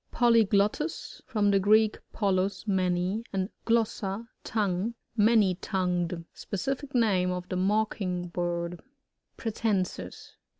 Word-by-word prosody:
PoLYGLOTTus. 230 - +2
— - - -44
From 210 -4 +3
the 195 - +4
Greek, 215 +2 +4
polu$^ 195 -1 0
many, 185 +2 0
and 190 0 -1 0.2
glossa^ 225 -2 0 0.2
tongue. 210 +1 -1 0.2
Many.tongued. 185 -5 +1
Specific 270 +7 -4
name 195 -6 +3
of 180 0 -3
the 185 - -2
Mocking 185 -2 0
bird. 175 0 -3 0.6
Pratb.nsis. 195 - -2
195 Hz, 100 wpm, -28 LUFS, 180-220 Hz, 0.6 s, the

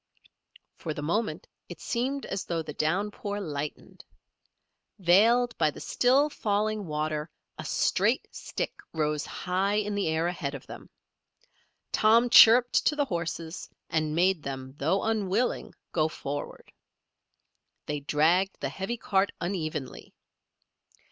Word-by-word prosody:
For 155 -2 -5
the 145 - -5
moment 170 0 -1 0.2
it 175 -3 -9
seemed 265 - -2
as 195 - -3
though 165 -2 -2
the 150 - -7
downpour 200 +6 -2
lightened. 150 -5 -6 0.9
Veiled 225 +6 +4
by 155 -2 +4
the - - -9
still 265 +4 +3
falling 215 - -1
water 155 0 -2 0.3
a - - -5
straight - - +1
stick - - -4 0.2
rose 150 -2 -1
high 190 +3 -1
in 210 0 0
the 200 -3 0
air 160 +1 0
ahead 150 -5 -3
of 135 - -9
them. - - -11 1.0
Tom 230 +3 +4
chirruped 240 +1 +7
to 300 - +2
the 290 -1 +1
horses 170 -4 -4 0.2
and 155 -1 0
made 180 0 +3
them, 130 -2 -6
though 165 +8 +1
unwilling, 220 +1 -1 0.2
go 155 -2 +2
forward. 145 -2 -6 1.1
They 150 0 -3
dragged 165 +7 +2
the 140 - -2
heavy 195 - -4
cart 200 -3 +1
unevenly. 155 -7 -4
180 Hz, 130 wpm, -28 LUFS, 155-215 Hz, 1.1 s, chirruped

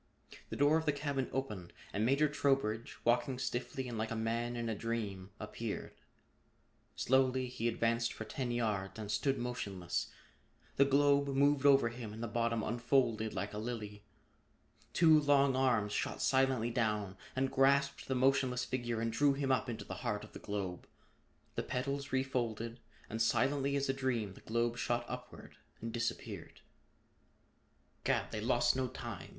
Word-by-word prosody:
The - - -4
door 145 +3 +4
of 160 -1 -3
the - - +5
cabin 140 -2 -2
opened 105 -10 -4 0.2
and 105 - 0
Major 140 +6 +4
Trowbridge, 135 -6 0
walking 120 +2 +2
stiffly 130 +1 -3
and 115 -3 -4
like 110 0 -1
a 115 - -3
man 115 +2 -1
in 120 -1 -2
a 115 - 0
dream, 105 -4 -3
appeared. 105 +1 -5 1.0
Slowly 130 0 +2
he 125 -2 -2
advanced 115 0 +1
for 110 - -6
ten 125 +3 -3
yards 105 -5 -1
and 105 -2 -4
stood 135 +6 +1
motionless. 100 -8 -3 0.7
The 140 - +6
globe 140 +1 +4
moved 140 +1 +3
over 135 -4 +6
him 115 -2 -7
and 110 +2 -6
the - - -1
bottom 115 0 0
unfolded 120 -2 +1
like 105 +1 -3
a 105 - -3
lily. 105 -3 -5 0.9
Two 160 -2 +6
long 140 -2 +4
arms 115 -6 +2
shot - - -2
silently 130 -3 +2
down 105 -5 0 0.2
and 130 0 +1
grasped 140 +1 +3
the 130 - 0
motionless 130 -1 +2
figure 120 -3 -2
and 115 0 -1
drew 140 +4 +4
him 135 -1 0
up 130 -1 +1
into 110 -3 -5
the - - -6
heart - - -2
of - - -12
the - - -8
globe. 95 -3 -4 0.7
The - - -1
petals 140 +2 -3
refolded, 120 -3 -1 0.3
and 110 +1 -3
silently 135 +5 +2
as 140 0 +1
a 135 - +2
dream 120 -7 -1
the - - -15
globe 120 +1 0
shot 120 +1 0
upward 125 0 -8 0.2
and 115 +1 -5
disappeared. 115 -1 -4 1.4
"Gad! - - +1
They 110 - -3
lost 120 +1 +3
no 130 -1 0
time!" 120 -6 -7
120 Hz, 165 wpm, -34 LUFS, 110-135 Hz, 1.4 s, The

